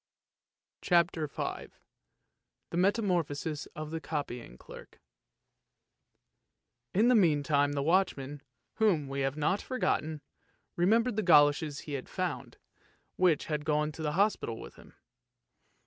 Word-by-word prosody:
CHAPTER 170 -3 +2
V - - -5 1.0
THE 170 - -3
METAMORPHOSIS 175 -7 0
OF 155 0 -6
THE 160 0 -4
COPYING 125 - -5
CLERK - - -13 2.0
In 215 +5 +4
the 250 - +5
meantime 145 -7 +3
the 140 -1 -1
watchman, 145 -5 0 0.4
whom 180 -10 +2
we 135 0 -4
have 135 +1 -1
not 155 +7 +1
for 255 - -5
gotten, 155 - -1 0.5
remembered 225 +6 +2
the - - +2
goloshes 145 -4 +4
he 150 - -8
had 135 -2 -5
found, - - -4 0.6
which 180 -5 +2
had 150 -2 -3
gone 150 0 0
to 160 - -9
the 150 -1 -1
hospital 195 - 0
with - - -10
him. - - -18
155 Hz, 125 wpm, -30 LUFS, 145-185 Hz, 2.0 s, the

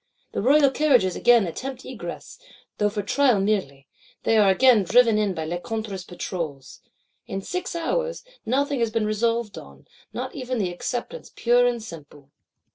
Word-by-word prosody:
The - - -2
royal 280 +4 +5
Carriages 255 - +3
again 240 -4 +4
attempt 255 +9 -6
egress;—though 215 - -6
for 205 0 -4
trial 250 0 +3
merely; 190 -10 -1 0.4
they 225 - +2
are 205 -2 +5
again 235 +3 +5
driven 225 +3 +4
in 205 -3 0
by 160 - -3
Lecointre's 195 +3 -4
Patrols. 165 -7 -6 0.5
In 195 - -4
six 360 - -4
hours, 485 +9 -2 0.2
nothing 275 +3 0
has 230 -1 +1
been 220 -1 -1
resolved 230 +1 -1
on; 70 -1 -15 0.2
not 255 +1 -5
even 255 -2 -4
the 190 -5 -1
Acceptance 245 - -5
pure 245 +1 +3
and 240 -2 -2
simple. 145 -7 -12
225 Hz, 150 wpm, -24 LUFS, 190-255 Hz, 0.5 s, royal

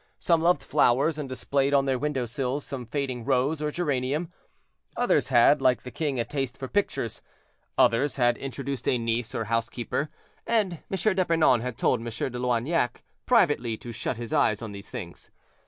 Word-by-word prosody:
Some 170 -2 +2
loved 170 -4 +3
flowers, 140 +7 +2
and 140 -3 -4
displayed 140 +2 0
on 135 -1 +4
their 130 -2 0
window 145 -3 -1
sills 135 +3 -3
some 125 -4 -6
fading 130 -2 -3
rose 135 +4 +1
or 150 - 0
geranium; 150 +1 -1 0.6
others - - +2
had, - - +5
like 125 -1 +3
the 125 - -8
king, 145 -5 -2
a 115 - 0
taste 135 -4 -3
for 130 - -5
pictures; 160 - -1 0.6
others 135 +5 +3
had 120 -2 +3
introduced 135 -1 -5
a 125 - +2
niece 115 0 -2
or 115 - -1
housekeeper; 115 +5 -2 0.4
and 205 -8 +1
M. 195 +2 +1
d'Epernon 165 -9 +3
had 125 -2 -4
told 125 - +2
M. 115 - -8
de 120 +2 -3
Loignac 125 +2 0 0.2
privately 145 - +3
to 120 - -8
shut 115 +1 -3
his 115 -1 -6
eyes 110 +1 +2
on 110 - -5
these 100 0 -9
things. 85 -1 -8
130 Hz, 175 wpm, -26 LUFS, 120-150 Hz, 0.6 s, had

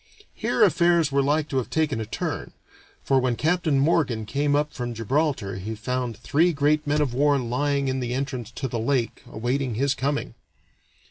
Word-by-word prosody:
Here - - +1
affairs 170 - +3
were 140 0 +3
like 150 +2 +1
to 135 - -1
have 125 -3 -1
taken 145 -3 0
a 110 - -5
turn, - - -4 0.5
for 135 -1 +3
when 125 -2 +1
Captain 160 0 +1
Morgan 135 -7 +1
came 145 +5 0
up 150 0 0
from 120 -1 -4
Gibraltar 115 -4 -1
he 105 +4 -5
found 125 +1 -3
three 160 +9 +2
great 150 +1 +1
men 150 +1 +2
of 135 -5 0
war 145 +2 +3
lying 140 +3 0
in 130 0 -1
the 125 -1 -2
entrance 130 -4 -3
to 135 - -3
the 115 -2 -3
lake 120 0 -1
awaiting 125 +1 -1
his 140 +4 +1
coming. 140 +2 -2
135 Hz, 185 wpm, -25 LUFS, 120-145 Hz, 0.5 s, affairs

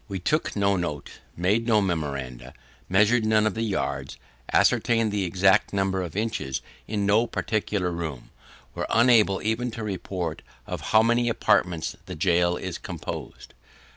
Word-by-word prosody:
We 100 -3 -4
took 150 - -1
no 100 -1 +2
notes, 75 -5 -4 0.3
made 105 +7 +1
no 110 -2 +4
memoranda, 70 -9 -3 0.3
measured 105 +5 +4
none 110 0 +3
of 110 - +1
the 110 - -3
yards, 105 -4 -2 0.3
ascertained 115 -2 +3
the 100 -2 -1
exact 95 +4 +3
number 95 -1 0
of 90 -1 -6
inches 105 - -2 0.2
in 100 -2 -1
no 110 +4 +3
particular 105 -6 -1
room: 80 -7 -6 0.4
are - - -3
unable 115 -5 +4
even 110 +3 -1
to 115 -1 -6
report 90 -5 -4 0.2
of - - -5
how 110 0 +5
many 120 +1 +2
apartments 90 -7 +1
the - - -6
gaol 85 +1 +2
is 95 -3 -5
composed. - - -7
100 Hz, 150 wpm, -25 LUFS, 90-110 Hz, 0.4 s, how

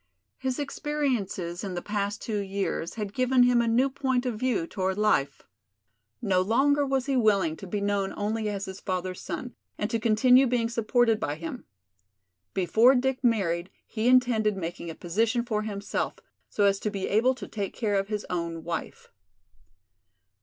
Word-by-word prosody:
His 260 -1 -2
experiences 255 - -2
in 190 -3 -4
the 175 - -3
past 205 0 -2
two 215 -2 -2
years 195 -4 -3
had 210 -3 -4
given 255 0 +3
him 245 -1 +4
a 235 - 0
new 240 +4 +3
point 260 -2 -1
of 235 -4 -2
view 245 -9 0
toward 190 +2 -2
life. 210 -10 +1 0.8
No 190 -4 +3
longer 280 +9 +3
was 265 -1 0
he 275 -1 0
willing 200 -9 +3
to 195 - -9
be 205 +3 -2
known 200 -1 0
only 215 +1 -1
as 200 -1 -3
his 190 0 -8
father's 185 -1 -3
son 190 +8 -5 0.2
and 210 +1 -2
to 230 - 0
continue 250 +4 +5
being 235 -2 +1
supported 230 -1 +2
by 145 -7 -2
him. 165 +10 -7 0.9
Before 220 +7 +5
Dick 260 +1 0
married 190 -7 +1 0.2
he 220 +1 -2
intended 240 -5 +3
making 170 -1 -5
a 165 - -6
position 225 +7 0
for 215 -3 -1
himself, 205 -2 -3 0.3
so 205 - 0
as 200 -1 +3
to 210 - -2
be 195 -2 -3
able 240 +5 +3
to - - -8
take 200 -3 -4
care 215 -3 -1
of 195 0 +1
his 210 -1 -3
own 170 -2 -3
wife. 170 -1 -5
215 Hz, 175 wpm, -27 LUFS, 195-245 Hz, 0.9 s, continue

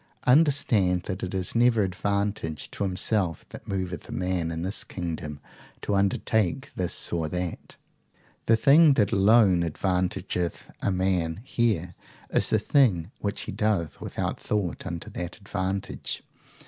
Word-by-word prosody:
Understand 125 - +4
that 95 0 -5
it 95 +1 -4
is 95 -1 0
never 115 -2 +4
advantage 100 -3 -2
to - - -9
himself 95 -2 -1
that - - -11
moveth 95 -2 -4
a - - -7
man 90 -2 -1
in 80 0 -4
this 95 +3 -1
kingdom 80 -5 -5 0.4
to - - -1
undertake 100 +5 +1
this 90 -1 -1
or 80 -2 -1
that. 90 0 -5 0.7
The 115 - +6
thing 145 +4 +6
that 105 -4 +2
alone 100 -3 +5
advantageth 90 0 -2
a - - +1
man 90 -2 0
here 105 -9 0 0.4
is - - +3
the - - +4
thing 105 - +2
which 100 -1 -2
he - - -5
doth 105 -6 -1
without - - -3
thought 100 -3 -2
unto 85 -2 -5
that 85 -1 -5
advantage. 100 -2 -4
95 Hz, 140 wpm, -26 LUFS, 90-105 Hz, 0.7 s, The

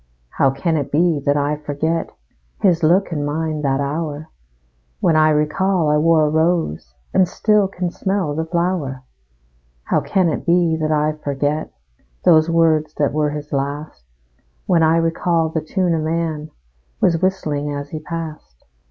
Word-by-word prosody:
How 135 - +2
can 155 +5 -1
it 140 -2 -3
be 165 0 +2
that 145 +1 +3
I 145 +1 0
forget 150 +3 -2 0.5
His 180 -4 +3
look 175 +4 +3
and 150 -3 -2
mein 155 +1 -2
that 135 -2 0
hour, 150 +1 -3 0.7
When 165 - +2
I 155 0 +5
recall 155 +2 +1
I 150 - +3
wore 160 0 +4
a - - +1
rose, 160 - 0 0.2
And 185 - +4
still 210 +2 +2
can 180 -2 -4
smell 190 -6 -1
the 160 +2 -2
flower? 170 -7 -2 0.8
How - - +1
can 190 -3 +1
it - - -3
be 170 -1 +2
that 155 -1 -1
I 150 0 +2
forget 145 +2 -2 0.5
Those 160 -2 +5
words 160 -2 +2
that 145 -2 0
were 150 0 +1
his 150 0 -7
last, 140 - -4 0.6
When 170 -2 +3
I 160 +1 +4
recall 165 0 +1
the 160 0 -2
tune 180 +2 0
a 165 - 0
man 155 -1 -2 0.5
Was 165 -2 +2
whistling 150 -6 -1
as 145 0 -6
he 155 - -4
passed? 155 - -8
155 Hz, 160 wpm, -19 LUFS, 150-170 Hz, 0.8 s, I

